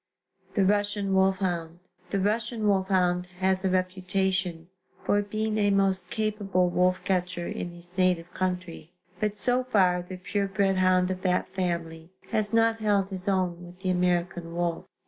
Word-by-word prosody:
THE 200 -3 +3
RUSSIAN 205 0 +1
WOLFHOUND. 185 -3 +1 0.3
The 200 - 0
Russian 215 +2 0
wolfhound 185 -2 +2
has 190 0 +1
a 190 - +2
reputation 185 -2 -1 0.4
for 205 - +2
being 215 +1 -2
a 205 -1 +3
most 195 -2 +1
capable 205 -4 0
wolf 180 +1 +2
catcher 180 -2 -1
in 175 - -4
his 175 +1 -11
native 180 -2 +1
country, 180 -3 -3 0.3
but 210 -1 -1
so 250 +3 +1
far 185 -7 +3
the 185 +1 -8
pure 200 +2 -1
bred 195 -1 +1
hound 185 0 +3
of 185 0 -4
that 180 -1 +1
family 170 -3 -3 0.2
has 210 -1 0
not 225 0 +3
held 205 -2 +1
his 185 0 -5
own 180 -3 0
with 175 +1 -13
the 185 -1 0
American 175 -1 0
wolf. 175 -1 -1
185 Hz, 155 wpm, -27 LUFS, 180-200 Hz, 0.4 s, THE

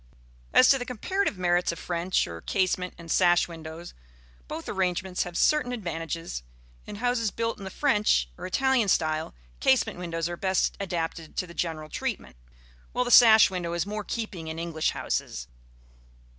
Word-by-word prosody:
As 255 - +7
to 270 - +5
the 245 - -4
comparative 255 - -1
merits 175 -1 +2
of 170 - -7
French, 175 +2 0
or 85 -1 -8
casement, 185 - -1
and 170 -1 -8
sash 175 -1 +4
windows, 165 0 -9 0.5
both 165 - -6
arrangements 185 -1 -1
have 175 -1 -6
certain 300 -5 +3
advantages. 165 - -4 0.5
In - - -7
houses 230 0 0
built 230 +2 -3
in 195 - -8
the - - -4
French 210 - +2
or - - -6
Italian 265 +2 +2
style, 155 - 0 0.2
casement 240 -7 +2
windows 165 -2 -2
are 175 - -4
best 190 +1 0
adapted 170 -4 -4
to - - 0
the 170 - -12
general 160 -3 -3
treatment; 210 - -4 0.6
while 250 - +1
the 245 - -2
sash 220 -4 +8
window 175 -2 -3
is 170 +1 -1
more 210 +1 -4
in - - -14
keeping 205 -8 -4
in 160 0 -5
English 165 -2 -1
houses. - - -3
180 Hz, 170 wpm, -27 LUFS, 165-220 Hz, 0.6 s, sash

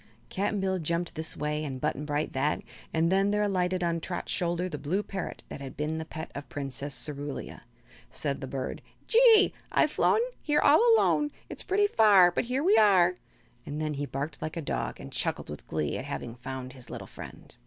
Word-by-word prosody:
Cap'n 205 +1 -1
Bill 190 -1 0
jumped 170 +2 -1
this 160 +1 -4
way 150 +1 -1
and 135 -3 -4
Button 145 +3 -2
Bright 150 0 -1
that, 140 +3 0 0.3
and 165 +2 +2
then 195 +1 +3
there 210 0 +2
alighted 185 -2 0
on 170 -1 0
Trot's 175 +1 -4
shoulder 175 +1 0
the 150 -5 -5
blue 170 +9 -1
parrot 195 -3 -5
that - - -7
had 135 -1 -8
been 155 +2 -2
the 160 - -4
pet 160 +1 -7
of 140 - -6
the - - -20
Princess 140 0 -3
Cerulia. 145 -1 -6 0.5
Said 140 -2 -3
the 135 - -4
bird: 130 0 -4 0.2
"Gee! 455 -3 +6 0.2
I've - - +3
flown 445 - +3 0.2
Here 295 -1 +2
all - - +6
alone. 295 -8 +3 0.2
It's - - -4
pretty 410 +2 +2
far, 205 - +6
But - - -1
here 255 +4 -1
we 390 +5 +5
are!" 185 -4 +5 0.5
and 145 +1 -5
then 155 -1 -1
he 145 0 -3
barked 140 +4 -4
like 155 +2 -4
a - - -2
dog - - -3
and - - -9
chuckled - - -2
with 75 - -9
glee 75 -2 -2
at - - -6
having 115 - -5
found 130 +1 -7
his 125 -3 -12
little - - -6
friend. - - -11
160 Hz, 205 wpm, -28 LUFS, 145-195 Hz, 0.5 s, Gee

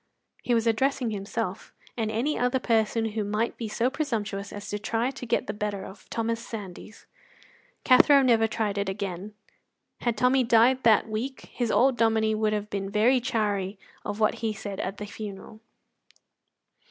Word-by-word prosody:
He 240 - +1
was 230 0 +1
addressing 245 +1 +1
himself 200 -1 -4 0.2
and 225 -2 -1
any 240 +8 0
other 250 +1 +1
person 225 -2 +1
who 215 0 -2
might 210 +3 -1
be 230 - -5
so 235 +4 0
presumptuous 215 -9 -3
as 205 0 -7
to 205 - -3
try 230 +4 -1
to 265 -2 -8
get - - +1
the 205 - -4
better 205 -2 -3
of 190 +1 -13
Thomas 230 0 -2
Sandys. 210 -1 -9 0.8
Cathro 275 +2 +6
never 230 -3 +4
tried 215 -2 -1
it 200 -1 -1
again. 195 +1 -5 0.6
Had 235 -2 -1
Tommy 255 +3 +3
died 240 +3 +4
that 220 -2 +4
week 230 +5 -5
his 240 -2 -1
old 255 +2 +3
Dominie 220 -1 +2
would 215 0 +1
have 210 0 -3
been 195 -1 -3
very 225 +6 +3
chary 210 -5 -1 0.3
of 205 - -4
what 215 -1 +2
he 220 -2 0
said 200 -1 -6
at 195 +2 -3
the 210 - -5
funeral. 210 0 -8
220 Hz, 170 wpm, -27 LUFS, 205-235 Hz, 0.8 s, Cathro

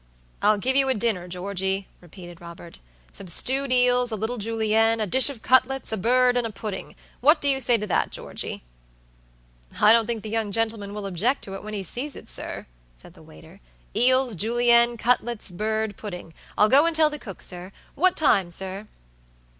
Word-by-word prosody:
"I'll 215 0 +3
give 255 +6 0
you 270 -1 +4
a 260 - +2
dinner, 210 -5 -1
Georgey," 190 +1 -3
repeated 175 0 -13
Robert"some 165 - -13
stewed 265 +9 +1
eels, 250 -1 +3
a - - -2
little 220 +3 -4
Julienne, 225 +1 +1
a 215 - 0
dish 260 +8 +4
of 260 -6 -9
cutlets, 260 +1 +2
a - - 0
bird, 250 +4 +3
and 245 -2 0
a - - -9
pudding. 205 -2 -7 0.2
What 300 +5 +4
do 285 - +1
you 270 -1 +3
say 240 -2 +3
to 210 - -4
that, 200 - 0
Georgey?" - - -6 1.2
"I 215 - +6
don't 230 -1 +2
think 230 -3 -4
the 215 - -7
young 220 -2 -2
gentleman 220 -2 -2
will 210 -1 -6
object 200 +9 -1
to 195 - -7
it 195 - -7
when 215 0 -7
he 200 - -4
sees 260 - -6
it, - - -13
sir," - - -7 0.3
said - - -16
the - - -18
waiter. 75 0 -16 0.4
"Eels, 255 -1 +4
Julienne, 235 +3 +3
cutlets, 240 -3 -1
bird, 215 +2 -2
puddingI'll 180 0 -3
go 280 +8 +5
and 335 - -1
tell 310 -1 +4
the 300 - -6
cook, 195 -9 -10
sir. 180 +1 -8 0.2
What 370 +3 +1
time, 195 - +2
sir?" 190 +4 -3
220 Hz, 185 wpm, -24 LUFS, 195-250 Hz, 1.2 s, I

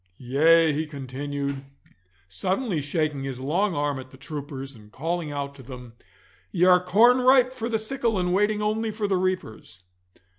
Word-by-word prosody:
Yea,' 155 +5 +4
he 155 +2 -2
continued, 140 0 -5 0.6
suddenly 185 - -2
shaking 145 -1 -1
his 135 -2 -5
long 175 +9 0
arm 145 -1 -1
at 130 0 -10
the 130 - -15
troopers, 140 -1 -7
and 105 -3 -16
calling 165 +3 -3
out 140 -1 -4
to 140 - -13
them, 125 -2 -10 0.6
'ye 180 -1 +2
are 180 -1 +5
corn 230 +7 +5
ripe 255 0 +5
for 235 -2 -4
the 225 - +1
sickle 230 0 -1
and 180 -1 0
waiting 210 +2 +1
only 220 +1 0
for 215 -1 -2
the 195 - +1
reapers! 180 - -3
160 Hz, 170 wpm, -25 LUFS, 135-205 Hz, 0.6 s, are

